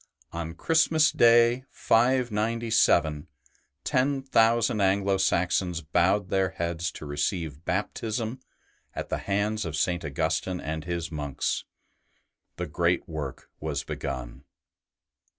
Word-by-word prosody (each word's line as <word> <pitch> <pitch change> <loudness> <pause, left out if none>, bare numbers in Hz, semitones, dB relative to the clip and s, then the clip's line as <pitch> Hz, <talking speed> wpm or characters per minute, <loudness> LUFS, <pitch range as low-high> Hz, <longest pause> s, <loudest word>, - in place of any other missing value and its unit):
On 85 -1 -5
Christmas 160 - +3
Day, 120 +1 +5
ST. - - -17
BENEDICT 125 +1 +4
115 115 +2 -1
597, 80 -8 +3 0.6
ten 135 +1 +1
thousand 115 -3 +3
Anglo 95 0 +2
Saxons 90 -2 +1
bowed 90 +5 +1
their 95 0 +1
heads 85 -1 -3
to - - -9
receive 75 +1 -2
Baptism 110 +5 -2 0.6
at - - -5
the - - -1
hands 105 +2 -1
of 80 -3 -4
St. 85 +3 0
Augustine 90 +5 -1
and 80 0 -4
his 85 -1 -3
monks; 75 -3 -2 0.9
the - - -3
great - - 0
work 75 -5 -6
was 75 -2 -3
begun. 65 -1 -6
95 Hz, 120 wpm, -27 LUFS, 80-115 Hz, 0.9 s, Day